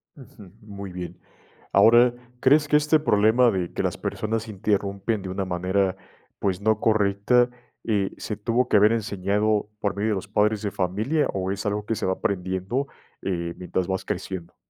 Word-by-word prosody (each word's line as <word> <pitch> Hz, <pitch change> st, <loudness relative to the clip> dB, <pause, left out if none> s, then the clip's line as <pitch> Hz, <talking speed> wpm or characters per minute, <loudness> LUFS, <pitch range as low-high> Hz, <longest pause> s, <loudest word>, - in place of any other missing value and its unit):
Ujú. 105 Hz, -, -14 dB
Muy 100 Hz, -3 st, -8 dB
bien. 90 Hz, 0 st, -7 dB, 0.5 s
Ahora, 120 Hz, +4 st, +6 dB, 0.3 s
¿crees 145 Hz, +3 st, +4 dB
que 150 Hz, -, +4 dB
este 150 Hz, +1 st, +3 dB
problema 115 Hz, -1 st, +4 dB
de 90 Hz, -4 st, -2 dB
que -, -, -2 dB
las -, -, -1 dB
personas 110 Hz, +1 st, -3 dB
interrumpen 100 Hz, +1 st, -1 dB
de 95 Hz, -, -6 dB
una 95 Hz, +1 st, -2 dB
manera, 95 Hz, +1 st, 0 dB, 0.4 s
pues, 95 Hz, -2 st, -1 dB
no 110 Hz, +1 st, +2 dB
correcta, 110 Hz, +3 st, +3 dB, 0.3 s
eh, 100 Hz, -4 st, 0 dB
se 105 Hz, -, -4 dB
tuvo 115 Hz, +4 st, 0 dB
que -, -, +4 dB
haber 105 Hz, +2 st, +6 dB
enseñado 105 Hz, 0 st, 0 dB
por 100 Hz, -3 st, -1 dB
medio 105 Hz, +2 st, 0 dB
de -, -, +1 dB
los 100 Hz, +1 st, -5 dB
padres 105 Hz, +1 st, +1 dB
de 100 Hz, -, -1 dB
familia 105 Hz, -, 0 dB
o 95 Hz, -1 st, -2 dB
es 100 Hz, +1 st, -3 dB
algo 105 Hz, 0 st, -1 dB
que 115 Hz, -, -1 dB
se -, -, -2 dB
va 95 Hz, -, +1 dB
aprendiendo, 95 Hz, +8 st, -2 dB, 0.4 s
eh, 85 Hz, -3 st, -3 dB
mientras 90 Hz, 0 st, -3 dB
vas 95 Hz, 0 st, -2 dB
creciendo? 95 Hz, -3 st, -5 dB
100 Hz, 175 wpm, -24 LUFS, 95-110 Hz, 0.5 s, Ahora